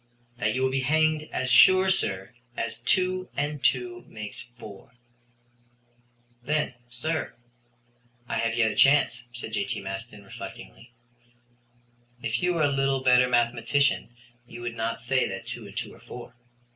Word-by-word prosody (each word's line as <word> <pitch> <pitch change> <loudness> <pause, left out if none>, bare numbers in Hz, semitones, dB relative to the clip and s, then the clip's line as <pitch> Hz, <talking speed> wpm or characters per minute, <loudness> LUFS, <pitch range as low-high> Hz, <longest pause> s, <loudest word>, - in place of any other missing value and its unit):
"That 110 +2 +1
you 130 - 0
will 130 - +2
be 135 0 0
hanged 155 +2 +2
as 130 0 -1
sure, 185 +7 +7
sir, 95 - -1 0.2
as 115 0 -3
two 185 +8 +1
and 145 -1 -2
two 120 -1 +1
make 105 -1 -7 0.2
four." 105 +1 -12 1.5
"Then, 150 +1 0 0.2
sir, 140 +5 -3 0.9
I - - -1
have 115 0 0
yet 115 -2 +3
a - - -6
chance," 130 -4 +4
said 120 -2 -7
J.T. 120 -1 -1
Maston, 100 +2 -7
reflectingly. 60 - -10 1.3
"If 115 0 -2
you 180 0 +1
were 160 - +2
a - - +5
little 135 -1 +1
better 125 -1 +5
mathematician 120 +2 +1 0.3
you 120 0 -10
would 120 -1 -4
not 115 0 -2
say 130 +2 +2
that 95 0 -6
two - - -7
and - - -11
two - - -4
are - - -16
four. - - -10
125 Hz, 150 wpm, -27 LUFS, 115-140 Hz, 1.5 s, sure